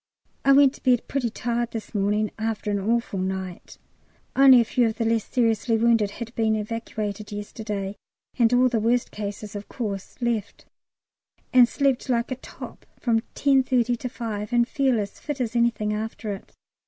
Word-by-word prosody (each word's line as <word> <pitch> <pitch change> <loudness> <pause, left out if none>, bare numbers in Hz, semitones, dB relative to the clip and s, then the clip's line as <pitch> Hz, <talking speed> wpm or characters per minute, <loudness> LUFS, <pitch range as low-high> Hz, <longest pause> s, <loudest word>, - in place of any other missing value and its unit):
I 275 - +5
went 275 -1 +6
to - - -15
bed 250 -3 +2
pretty 260 -4 -1
tired 235 +1 -2
this 225 -2 -7
morning 210 +1 +1
after 220 -1 -2
an 200 - 0
awful 225 -1 0
night 190 -1 -5 0.6
(only 265 -2 +8
a 235 - +3
few 240 +1 +2
of 220 - -2
the 230 - 0
less 225 -1 +1
seriously 225 -1 +1
wounded 225 -2 +3
had 230 +3 -8
been 220 -2 +1
evacuated 215 -1 -4
yesterday, 205 -1 -5 0.4
and 230 -1 +5
all 250 +1 +5
the 240 -3 0
worst 235 +3 0
ones, 205 0 -5
of 205 0 -7
course, 200 -5 -5
left), 235 -4 -2 0.9
and 245 -2 +7
slept 275 -2 0
like 235 0 0
a - - 0
top - - -11
from 225 -2 +1
10.30 255 -3 +3
to 250 - -4
5, 220 -3 -5
and 240 -1 +3
feel 265 -5 +1
as 200 -1 -5
fit 295 -2 -5
as 240 -2 -2
anything 225 -3 +1
after 215 0 -4
it. 195 - -10
230 Hz, 175 wpm, -25 LUFS, 210-245 Hz, 0.9 s, only